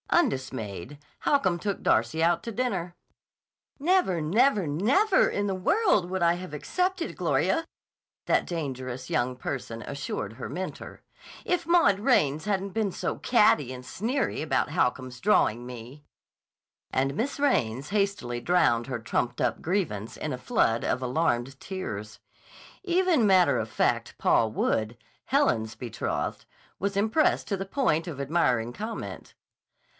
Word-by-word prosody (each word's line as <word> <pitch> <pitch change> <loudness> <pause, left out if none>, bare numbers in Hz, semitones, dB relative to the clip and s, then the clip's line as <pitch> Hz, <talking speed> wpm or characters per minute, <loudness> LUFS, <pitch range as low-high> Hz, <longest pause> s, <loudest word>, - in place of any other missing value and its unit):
Undismayed, 130 - -1 0.2
Holcomb 190 -12 +2
took 200 0 -3
Darcy 120 +9 +2
out 170 0 +2
to 230 - -4
dinner. 195 -8 -2 0.8
("Never, 325 - +2
never, 200 - +2
never 260 - +3
in 205 0 -1
the 195 - -1
world 210 - +2
would 190 0 -2
I 170 0 +5
have 180 -3 -7
accepted, 365 - -2
Gloria," 330 - +1 0.6
that - - +2
dangerous 130 -6 -4
young 125 +1 0
person 115 -4 -5
assured 135 -6 -4
her 120 - -7
mentor, 185 +1 -6 0.4
"if 355 -1 0
Maud 335 - +4
Raines 155 - +2
hadn't 200 -1 -1
been 210 0 0
so - - -3
catty 185 - +3
and 125 -1 -8
sneery 235 - -2
about 150 -1 0
Holcomb's 125 -3 -1
drawing 120 - +2
me.") 125 +4 -10 0.9
And 135 +1 0
Miss 270 - -2
Raines 135 - +1
hastily 200 - -1
drowned 120 -10 +2
her 130 -3 -3
trumped 120 +2 -2
up - - 0
grievance 160 - -2
in 155 - -3
a - - -3
flood 125 - +1
of 130 - 0
alarmed 130 -1 0
tears. 110 - -6 0.6
Even 355 - +3
matter 185 -3 +4
of 110 0 -3
fact - - 0
Paul 110 -1 +3
Wood, 110 +1 0 0.3
Helen's 115 - +1
betrothed, 115 0 -3 0.3
was 200 +1 -1
impressed 220 +10 +2
to 200 - +1
the 195 0 -4
point 180 - 0
of 150 -5 -6
admiring 130 -6 +1
comment. 220 - -6
170 Hz, 140 wpm, -27 LUFS, -, 0.9 s, I